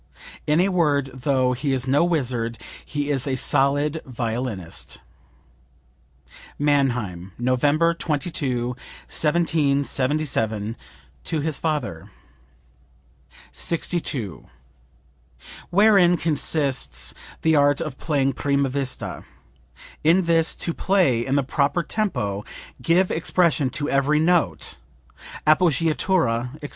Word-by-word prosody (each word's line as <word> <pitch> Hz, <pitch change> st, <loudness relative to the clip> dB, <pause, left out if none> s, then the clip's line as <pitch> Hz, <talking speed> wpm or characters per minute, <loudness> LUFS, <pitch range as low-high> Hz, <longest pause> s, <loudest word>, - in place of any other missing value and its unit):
In 150 Hz, +2 st, +3 dB
a 190 Hz, +2 st, +3 dB
word, 145 Hz, -7 st, +1 dB
though 130 Hz, -1 st, +1 dB
he 135 Hz, +2 st, -1 dB
is 130 Hz, 0 st, -2 dB
no 140 Hz, +5 st, +3 dB
wizard 125 Hz, -9 st, -1 dB, 0.3 s
he 145 Hz, 0 st, -3 dB
is 135 Hz, -1 st, 0 dB
a 135 Hz, -, 0 dB
solid 145 Hz, +4 st, +1 dB
violinist." 115 Hz, -7 st, -4 dB, 1.6 s
(Mannheim, 120 Hz, -11 st, 0 dB
November 145 Hz, +7 st, +2 dB
22, 145 Hz, -6 st, -2 dB
1777, 140 Hz, -6 st, -1 dB, 0.5 s
to 160 Hz, -3 st, -1 dB
his 155 Hz, -1 st, -3 dB
father.) 145 Hz, -, -3 dB, 1.4 s
62. 155 Hz, -, -2 dB, 1.2 s
"Wherein 195 Hz, -2 st, +5 dB
consists 145 Hz, -4 st, -1 dB, 0.3 s
the 160 Hz, -1 st, +4 dB
art 145 Hz, -1 st, +4 dB
of 155 Hz, -5 st, -5 dB
playing 140 Hz, -4 st, +1 dB
prima 140 Hz, +1 st, 0 dB
vista? 135 Hz, 0 st, -4 dB, 0.8 s
In 170 Hz, +5 st, +4 dB
this: 165 Hz, -1 st, +2 dB
To 170 Hz, -, -2 dB
play 170 Hz, -14 st, +2 dB
in 135 Hz, +3 st, -1 dB
the 140 Hz, -, +2 dB
proper 145 Hz, +5 st, 0 dB
tempo; 105 Hz, -, -2 dB, 0.4 s
give 175 Hz, +7 st, +2 dB
expression 165 Hz, -4 st, +2 dB
to 145 Hz, +2 st, -3 dB
every 140 Hz, +1 st, +2 dB
note, 160 Hz, -, +1 dB, 0.7 s
appoggiatura, 155 Hz, -5 st, +2 dB
etc. 150 Hz, -1 st, -8 dB
145 Hz, 100 wpm, -23 LUFS, 130-160 Hz, 1.6 s, Wherein